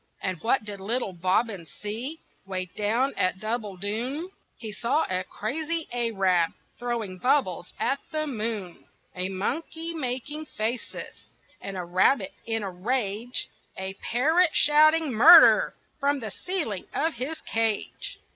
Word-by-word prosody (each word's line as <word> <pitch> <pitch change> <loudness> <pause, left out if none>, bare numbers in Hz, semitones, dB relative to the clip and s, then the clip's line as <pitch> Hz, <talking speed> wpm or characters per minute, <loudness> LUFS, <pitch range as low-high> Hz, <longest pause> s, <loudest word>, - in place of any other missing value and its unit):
And 185 -4 -2
what 230 +1 +1
did 205 -1 -6
little 220 0 -1
Bobbin 185 +1 0
see 225 - -6 0.3
'Way 185 -1 -2
down 230 +6 +1
at 185 0 +1
Doubbledoon? 220 - -3 0.3
He 220 -2 -7
saw 235 +9 +1
a 185 0 -1
crazy 315 - -3
Arab 195 -8 +2 0.3
Throwing 230 -6 -3
bubbles 185 - +1
at 275 - +1
the 310 -1 -1
moon, 215 - -4 0.3
A 185 +1 -2
monkey 320 - -3
making 295 +1 -4
faces 230 +3 -5 0.3
And 195 -1 -5
a 180 - -3
rabbit 185 +10 +2
in 225 -1 -1
a 195 - -3
rage, 225 +4 -2 0.3
A 190 0 -4
parrot 315 +8 +3
shouting 310 0 +5
"Murder!" 330 - +8 0.2
From 285 0 +1
the 220 -4 -5
ceiling 310 - -2
of 320 +2 +1
his 305 +5 -3
cage. 225 - -2
230 Hz, 130 wpm, -26 LUFS, 195-290 Hz, 0.3 s, Murder